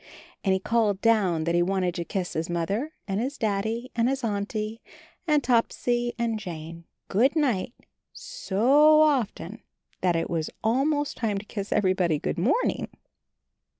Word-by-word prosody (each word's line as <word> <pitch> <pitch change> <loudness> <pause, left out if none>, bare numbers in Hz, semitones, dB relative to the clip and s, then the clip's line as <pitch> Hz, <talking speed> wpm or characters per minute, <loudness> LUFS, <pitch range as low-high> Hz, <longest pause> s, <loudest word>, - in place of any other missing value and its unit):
And 195 - +2
he 190 - +2
called 210 -1 +1
down 200 -8 +2
that 170 +1 0
he 175 - +3
wanted 185 0 0
to 170 -1 -3
kiss 180 +1 -3
his 160 +2 -3
Mother 195 - -2 0.2
and 195 +1 -1
his 270 +4 -3
Daddy 220 +3 -2
and 235 +1 +2
his 270 -1 -2
Auntie 215 +1 -3 0.5
and 300 -3 +3
Topsy 240 0 +1
and 230 -2 -1
Jane, 170 -3 -8 0.2
"Good 255 - +2
night," 250 -7 0 0.4
so 305 - +3
often 235 - 0 0.4
that 180 -2 +2
it 165 - 0
was 165 -2 -2
almost 285 +6 +1
time 215 -4 -1
to 200 - -6
kiss 205 -1 -6
everybody 185 -5 +2
"Good 145 - -3
morning." 260 - +1
215 Hz, 150 wpm, -26 LUFS, 185-245 Hz, 0.5 s, he